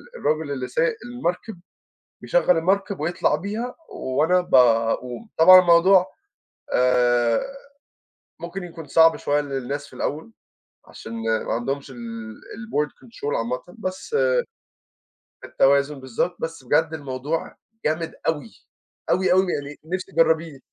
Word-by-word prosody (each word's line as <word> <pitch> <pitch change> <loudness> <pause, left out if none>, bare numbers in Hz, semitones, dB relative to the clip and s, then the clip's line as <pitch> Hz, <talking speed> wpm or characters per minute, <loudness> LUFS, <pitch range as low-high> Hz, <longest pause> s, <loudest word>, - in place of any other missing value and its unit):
الراجل 155 - -1
اللي 130 -2 -3
سايق - - 0
المركب 220 -5 -4 0.6
بيشغَل - - +2
المركب 195 +2 0
ويطلع 170 +4 0
بيها، 220 +6 -4 0.2
و 130 - -5
وأنا 180 +4 +4
ب 180 - -5 0.5
وطبعًا 185 - +5
الموضوع 180 +2 +5 0.7
آآ 120 -2 +3 1.0
ممكن 175 +2 -6
يكون 165 -2 -9
صعب 165 +3 +5
شوية 145 +1 0
للناس 140 0 -4
في - - -20
الأول، 145 -6 -4 0.5
عشان 115 - -11 0.3
ما - - -3
عندهمش 135 +4 -3
ال 130 - -11 0.4
الBoard 210 -10 -4
Control 145 -11 -5
عامةً، 125 +2 -2 0.2
بس 190 - -4 1.3
التوازن 140 +1 +2
بالضبط، 130 +7 -2
بس 165 -4 -5
بجد 150 +5 +2
الموضوع 145 +2 -4 0.3
جامد 160 +2 -1
أوي، 145 -8 -2 0.6
أوي، 185 0 +2
أوي 185 -1 +2
يعني 145 0 -5
نفسي 185 +3 -4
تجربيه. 160 -3 +2
160 Hz, 120 wpm, -23 LUFS, 140-185 Hz, 1.3 s, وطبعًا